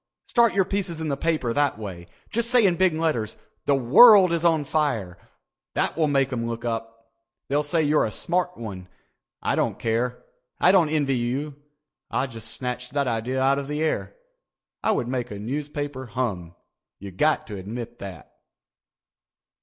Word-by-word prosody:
Start 235 -3 +3
your 195 -2 +3
pieces 185 -4 -2
in 160 -1 -3
the 140 - 0
paper 150 -6 -1
that 145 -4 +1
way. 95 -5 -8 0.2
Just 235 +1 0
say 245 -3 +5
in 180 -3 +3
big 185 -1 +3
letters 150 -10 -1 0.3
'The 140 - +4
World 180 - +7
Is 170 -1 0
On 165 -3 +3
Fire.' 130 - -1 0.6
That - - 0
will 160 -1 +2
make 135 -2 +1
'em 115 -1 -2
look 115 0 -5
up. 115 0 -5 0.4
They'll 145 +2 +2
say 155 +2 +1
you're 150 +1 +3
a - - -6
smart 180 +6 -1
one. 95 -5 -7 0.6
I - - +1
don't - - 0
care. 120 +2 -1 0.4
I 180 - +6
don't 180 -5 +4
envy 145 -4 +1
you. 130 +5 -2 0.6
I - - 0
just 115 -4 -8
snatched 125 0 -5
that 140 -1 +2
idea 120 +3 -1
out 135 +1 +3
of 140 - -6
the 150 +2 -2
air. 160 - -2 0.7
I - - +1
would 165 - +1
make 125 -1 -2
a 105 - -6
newspaper 140 +3 -4
hum. 100 -8 -3 0.4
You 100 0 -9
got 150 +12 +1
to 105 -2 -7
admit 115 +5 -7
that." 95 -7 -9
135 Hz, 175 wpm, -24 LUFS, 115-160 Hz, 0.7 s, World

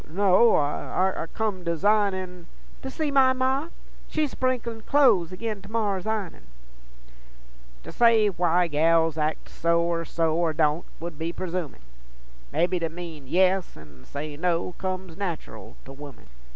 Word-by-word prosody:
no... 195 +6 +4
I 165 +4 -1
come 210 -5 -2
dasignin' 185 0 0 0.3
'To 265 - -5
see 295 +2 -2
my 265 -2 +5
Ma? 260 +4 0 0.4
She's 305 -3 -1
sprinklin' 240 -3 -2
clo'es 215 - +3
Agin 210 +2 -4
to - - -13
morrer's 210 -4 -1
i'nin'.' 215 -5 -3 1.4
To - - -9
say 230 -3 +4
why 175 -1 +2
gals 165 0 +2
acts 155 +1 -2
so 170 0 +2
or 170 0 -1
so, 165 0 0
Or 165 -1 +1
don't, 155 +1 +1 0.2
'ould 170 -3 -6
be 165 +1 -2
persumin'; 175 - -5 0.7
Mebby 180 - +1
to 165 -1 -2
mean 165 -4 -9
yes 185 +3 +2
an' 75 -4 -15
say 145 +1 -6
no 170 +2 0
Comes 185 -2 -4
nateral 175 - -6
to - - -10
women. 140 -3 -11
180 Hz, 140 wpm, -25 LUFS, 165-210 Hz, 1.4 s, my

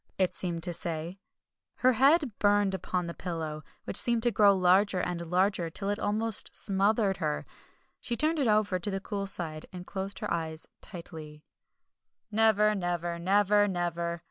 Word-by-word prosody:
it 185 -2 +1
seemed 170 -3 -1
to 175 - -1
say. 170 +2 -2 0.6
Her 255 0 +3
head 280 +3 +4
burned 205 -1 +3
upon 180 -1 -2
the 170 - -5
pillow, 160 -4 -5 0.2
which - - -6
seemed 235 -2 +1
to 240 - +3
grow 200 -1 +5
larger 185 +1 +3
and 175 -1 -3
larger, 180 0 +1
till 195 +4 -3
it 205 - -3
almost 215 +1 0
smothered 200 0 +1
her. 75 0 -2 0.5
She 240 - -3
turned 310 +3 +1
it 270 - +1
over 210 -3 +2
to 205 - -4
the 195 -1 -2
cool 200 0 -4
side, 160 -5 -3
and 180 -1 -8
closed 195 +1 -3
her - - -3
eyes 160 -1 -4
tightly. 160 -5 -10 0.9
"Never 215 -1 +3
never! 175 -3 -2
Never 205 +3 +3
never!" 170 -2 -2
190 Hz, 165 wpm, -29 LUFS, 170-210 Hz, 0.9 s, grow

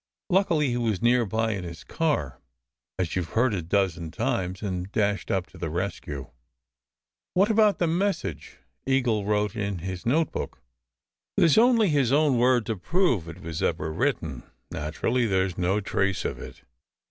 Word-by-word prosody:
Luckily 170 -6 +3
he 120 - -1
was 110 -5 0
near 120 0 +3
by 110 +3 0
in 100 -4 -3
his 85 -1 -8
car, 80 - -1 0.6
as 90 -3 -2
you 90 - +1
ve 80 - -8
heard 120 +1 +3
a 95 - -1
dozen 85 -2 0
times, 100 -2 -2
and 95 -1 -3
dashed 105 -4 0
up 95 -2 0
to - - -14
the 80 - -3
rescue." 85 -5 -4 1.0
"What 195 +4 +4
about 215 -2 +4
the 175 - +1
message 165 - -2 0.3
Eagle 125 -6 +1
wrote 105 0 0
in 100 -3 -2
his 90 +1 -5
note 155 +7 +2
book?" - - -5 0.8
"There - - +5
s 160 - +5
only 230 -3 +5
his 140 -5 +2
own 145 -3 +3
word 125 -2 +3
to 110 -1 -2
prove 125 - +1
it 85 +3 -10
was 85 -1 -5
ever 80 -2 -1
written. 80 - -1 0.3
Naturally 115 +11 -1
there 95 -2 +2
s 95 -3 -5
no 95 +3 +1
trace 95 -2 -1
of - - -3
it." - - -10
105 Hz, 175 wpm, -26 LUFS, 90-135 Hz, 1.0 s, There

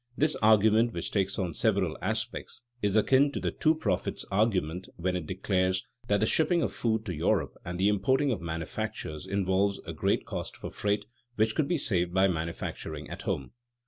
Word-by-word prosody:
This 155 +2 +3
argument, 110 +2 +4
which - - -4
takes 100 -1 0
on 90 -3 -2
several 95 -4 +1
aspects, 110 +5 -3 0.2
is 105 0 +1
akin 135 +6 +4
to - - -2
the - - -1
"two 155 0 +2
profits" 100 - -1
argument 95 -4 0
when 90 +1 -1
it 85 -4 -3
declares 95 0 0 0.2
that 100 -1 +2
the - - +4
shipping 165 +7 +3
of - - -1
food 110 -1 0
to 90 - -3
Europe 75 - 0
and 90 +1 -5
the 95 +2 +3
importing 130 +8 +2
of 105 -8 -2
manufactures 80 -2 -4
involve 100 0 +1
a - - -5
great - - 0
cost - - -5
for - - -7
freight 100 0 -1 0.3
which 110 0 +2
could 150 +2 +1
be 175 - +1
saved 90 - 0
by 95 +1 +5
manufacturing 80 -3 -4
"at - - -6
home." 65 - -3
100 Hz, 185 wpm, -29 LUFS, 90-110 Hz, 0.3 s, by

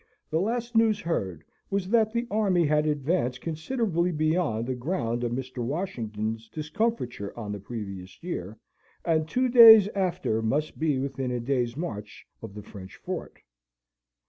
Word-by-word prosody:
The 160 +2 +1
last 235 +3 -2
news 225 -2 +4
heard 95 - -3 0.3
was 195 -2 -1
that 220 -1 +3
the 235 +1 -1
army 195 -5 +2
had 150 +1 +2
advanced 145 -3 0
considerably 170 +1 -1
beyond 155 -7 0
the 130 - -2
ground 120 -3 -2
of 120 - -1
Mr. 130 0 -4
Washington's 115 - -3
discomfiture 155 - -3
on 105 -3 -5
the 105 - -4
previous 100 - -8
year, 110 - -5 0.5
and 160 -1 +1
two 255 +1 +1
days 225 -4 +10
after 180 - -1
must 145 +8 -1
be 155 -3 +1
within 135 -1 -3
a 125 -1 -1
day's 120 0 -1
march 105 -11 -6 0.2
of 110 -3 -9
the 105 - -8
French 95 -3 -11
fort. - - -6
150 Hz, 150 wpm, -27 LUFS, 115-185 Hz, 0.5 s, days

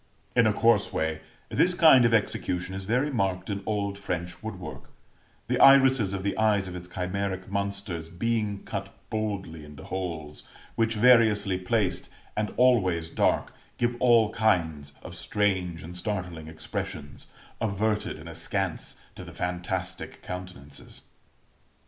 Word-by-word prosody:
In 115 -3 +5
a - - +4
coarse 105 -1 +3
way, 80 0 -1 0.3
this 180 0 +3
kind 155 -8 +7
of 115 - +4
execution 95 -4 0
is 95 0 -5
very 125 +8 +1
marked 95 -5 -1
in 100 0 -3
old 100 -2 -1
French 90 -2 -4
woodwork; 105 -5 -7 0.6
the - - 0
irises 135 -6 +6
of 95 -1 -3
the 100 - -1
eyes 105 -3 +3
of 90 - -7
its 90 0 -7
chimeric 95 +1 -3
monsters 100 -4 -2
being 105 +2 -1
cut 100 -1 -5 0.2
boldly 100 -7 -3
into 75 -1 -11
holes, 80 -5 -5 0.3
which, 115 0 +1
variously 105 -5 +5
placed, 100 0 0 0.3
and 105 0 -1
always 95 -10 +3
dark, - - +1 0.2
give 120 0 +1
all 115 -3 +5
kinds 80 -11 0
of - - -8
strange 95 -5 -1
and 85 +2 -8
startling 90 -5 -3
expressions, 80 -2 -6 0.3
averted 105 0 0
and - - -11
askance, - - -3 0.2
to - - -9
the - - -10
fantastic 90 +1 -4
countenances. 90 -6 -8
100 Hz, 135 wpm, -27 LUFS, 90-110 Hz, 0.6 s, kind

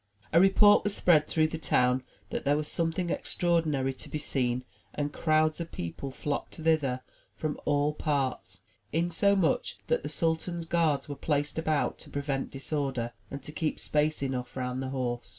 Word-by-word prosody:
A 165 - +7
report 205 +2 +6
was 205 -1 0
spread 155 -4 +4
through 155 -1 +2
the 160 - -5
town 125 -4 +2 0.3
that - - -2
there 145 +1 +3
was 150 0 -2
something 170 +2 0
extraordinary 155 -6 +1
to - - -8
be - - -2
seen, 125 -4 0 0.3
and 145 0 -2
crowds 155 0 +2
of 165 - -6
people 85 +11 -5
flocked 140 +2 -3
thither 160 0 +3
54 155 - 0
THE 140 - 0
TREASURE 130 0 -3
CHEST - - -33
from 155 -2 -2
all 145 +1 +2
parts, 135 - -2 0.3
insomuch 175 +2 +2
that 485 -1 +1
the - - -5
sultan's 165 +1 -1
guards 160 -5 +1
were 145 - -5
placed 145 +1 0
about 155 -3 0
to - - -10
prevent 140 -1 -2
disorder, 135 -4 -2 0.2
and 140 -1 -7
to 150 - -7
keep 155 0 -2
space 150 -1 +1
enough 130 -1 -3
round 125 0 -2
the 130 - -3
horse. 120 -5 -3
150 Hz, 185 wpm, -29 LUFS, 135-160 Hz, 0.3 s, A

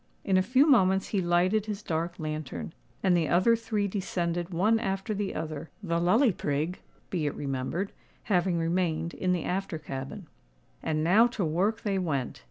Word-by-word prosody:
In 195 - +1
a 185 - +5
few 255 +9 +4
moments 190 -10 +4
he 200 - +1
lighted 180 +5 +2
his 210 0 -4
dark 165 +1 -2
lantern; 155 - -5 0.3
and 185 -2 +4
the 165 -3 +1
other 185 +7 +4
three 220 -3 -1
descended 175 -3 -2
one 205 +6 +2
after 195 +1 -2
the 200 -1 -3
other, 155 0 -5
the 170 -3 0
Lully 220 +9 +4
Prig, 155 +1 -2 0.3
be 165 -5 0
it 145 - -3
remembered, 140 +8 -3 0.3
having 180 -3 +1
remained 165 -1 0
in 185 - -1
the 180 -3 0
after 190 -2 -2
cabin. 145 +6 -6 0.6
And 155 0 -1
now 205 +8 +6
to 220 -6 -2
work 195 +8 0
they 195 -2 0
went. 140 -8 -2
180 Hz, 175 wpm, -28 LUFS, 160-200 Hz, 0.6 s, now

